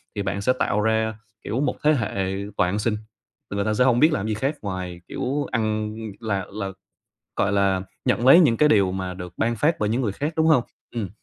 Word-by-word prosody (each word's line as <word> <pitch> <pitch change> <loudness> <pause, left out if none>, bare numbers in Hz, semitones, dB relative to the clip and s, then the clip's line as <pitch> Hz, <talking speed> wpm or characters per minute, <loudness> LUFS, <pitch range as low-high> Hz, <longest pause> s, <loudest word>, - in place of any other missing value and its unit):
thì 105 - -2
bạn 100 0 -2
sẽ 125 +6 +3
tạo 105 -4 0
ra, 110 0 +1 0.3
kiểu, 120 - -2
một 145 - 0
thế 155 +1 +5
hệ 100 -7 -1 0.2
toàn 90 - +3
ăn 100 +3 -1
xin. 105 0 0 0.5
Thì - - -3
người 100 0 0
ta 110 - +1
sẽ 125 - +3
hông 125 -2 +3
biết 155 +3 +5
làm 105 -3 -1
gì 110 - 0
khác 135 +8 -1
ngoài, 90 -3 -5
kiểu, 140 +3 -2
ăn 110 -2 -1 0.2
là 100 -5 -2
là 100 -1 -4 0.6
gọi 100 - +1
là, 100 -2 +2 0.2
nhận 120 - +1
lấy 150 +6 +9
những 130 -10 +4
cái 150 - +4
điều 100 -6 +4
mà 95 -1 -3
được 90 -1 -8
ban 115 +1 +1
phát 150 +8 +2
bởi 105 - 0
những 120 +4 0
người 110 -5 0
khác, 145 +10 -3
đúng 160 0 +2
hông? 150 -7 +5 0.3
Ừm, 110 -5 -2
110 Hz, 235 wpm, -24 LUFS, 100-125 Hz, 0.6 s, lấy